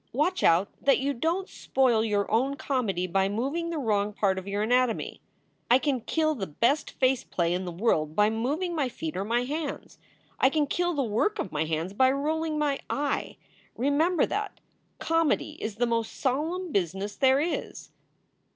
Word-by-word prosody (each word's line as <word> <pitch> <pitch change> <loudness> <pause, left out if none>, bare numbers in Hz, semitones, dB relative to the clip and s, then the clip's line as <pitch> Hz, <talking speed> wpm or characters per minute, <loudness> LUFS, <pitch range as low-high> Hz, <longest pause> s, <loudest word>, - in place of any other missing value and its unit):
Watch 370 +1 -2
out 170 +4 +4
that 275 - +4
you 280 +2 -1
don 330 +9 -1
t - - -21
spoil 245 -5 +2
your 205 -2 +1
own 260 +6 +2
comedy 225 - -1
by 190 +2 +1
moving 275 +11 -2
the 335 - -3
wrong 210 -6 0
part 195 -2 +1
of 190 - -11
your 200 +1 -1
anatomy. 245 +1 0 0.5
I 245 - +7
can 265 -2 -1
kill 310 +6 +1
the 205 -10 -4
best 245 - +1
face 260 -1 +2
play 170 -1 -1
in 185 +1 -2
the 175 - -4
world 165 -5 0
by 210 +1 +4
moving 290 +11 -1
my 280 -5 0
feet 315 +5 -5
or 190 - -1
my 235 +4 0
hands. 295 +3 -5 0.4
I 265 - +5
can 300 +1 +1
kill 350 +4 -1
the 280 - +1
work 245 - 0
of 190 - -3
my 155 +1 -1
hands 160 +4 -2
by 260 +5 +4
rolling 310 +3 -1
my 290 -2 0
eye. 285 -1 -2 0.4
Remember 295 +7 +2
that! - - -4 0.4
Comedy 330 -2 +1
is 215 -2 -3
the 245 +3 +1
most 230 -1 -1
solemn 320 +7 -1
business 195 - -1
there 265 0 +4
is." 330 +4 -3
255 Hz, 185 wpm, -27 LUFS, 205-300 Hz, 0.5 s, I